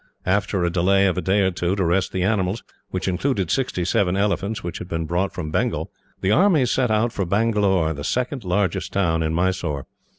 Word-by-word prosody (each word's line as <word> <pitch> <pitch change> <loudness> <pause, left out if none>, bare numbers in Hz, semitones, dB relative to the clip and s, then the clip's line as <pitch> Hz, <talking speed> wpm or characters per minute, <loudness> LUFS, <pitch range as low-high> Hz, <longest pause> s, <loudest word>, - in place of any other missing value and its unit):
After 95 0 +1
a 85 - +1
delay 95 +3 +3
of 95 - +2
a 90 - -1
day 95 +4 +2
or 95 -1 +2
two, 90 +1 -1
to 95 -3 0
rest 90 +3 +1
the 95 -1 -1
animals, 100 +1 0 0.3
which 95 0 -3
included 95 - 0
sixty 125 -9 -1
seven 90 +1 +1
elephants 100 +1 -1
which 85 - -5
had - - -7
been 80 -1 -2
brought 90 +4 -1
from 80 -4 -5
Bengal, - - -1 0.3
the 95 - +1
army 170 - +4
set 125 0 +1
out 110 +2 +1
for 100 - -1
Bangalore, 100 -4 +1
the 70 -1 -7
second 125 - -2
largest 95 0 -1
town 85 -5 +1
in 80 0 0
Mysore. 85 -6 -1
95 Hz, 205 wpm, -22 LUFS, 90-105 Hz, 0.3 s, army